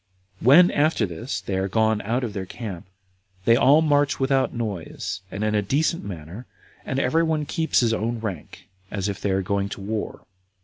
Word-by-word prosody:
5. - - -4
When, 175 +7 +8
after 155 +3 +2
this, 105 - -5
they 95 - -3
are 95 +1 0
gone 110 +1 +1
out 120 +5 -1
of 115 -4 -3
their 95 -2 -5
camp, 95 -6 -7 0.6
they 115 - +6
all 145 +5 +5
march 145 -2 +2
without 135 0 +2
noise, 100 -5 -4
and 100 +2 -4
in 105 0 +1
a 105 - +2
decent 150 - 0
manner, 90 +4 -8 0.4
and 135 - -3
every 160 +4 +2
one 160 -2 0
keeps 160 0 +1
his 115 -2 +2
own 115 +1 -2
rank, 100 -8 -7 0.2
as 100 -1 -2
if 100 - -4
they 100 - 0
were 95 0 +1
going 100 +1 -1
to - - -7
war. 105 +2 -4
110 Hz, 200 wpm, -24 LUFS, 100-135 Hz, 0.6 s, When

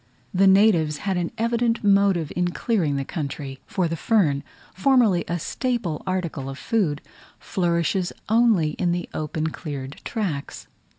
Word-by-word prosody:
The 195 +1 +4
natives 190 -6 +4
had 195 -2 +1
an 175 -1 -1
evident 235 0 +1
motive 195 -6 +3
in 180 0 +1
clearing 175 -5 0
the 135 0 -2
country; 140 -3 -5
for 180 -2 0
the 165 - -2
fern, 155 -7 +2 0.3
formerly 220 -5 +3
a 175 - -1
staple 220 - -2
article 170 -7 -2
of 135 - -7
food, 170 -10 0 0.3
flourishes 175 0 0 0.2
only 220 -8 +3
in 175 -2 +2
the 175 0 -3
open 155 +1 -2
cleared 140 -4 -7
tracks. 180 -12 -4
175 Hz, 140 wpm, -24 LUFS, 155-205 Hz, 0.3 s, The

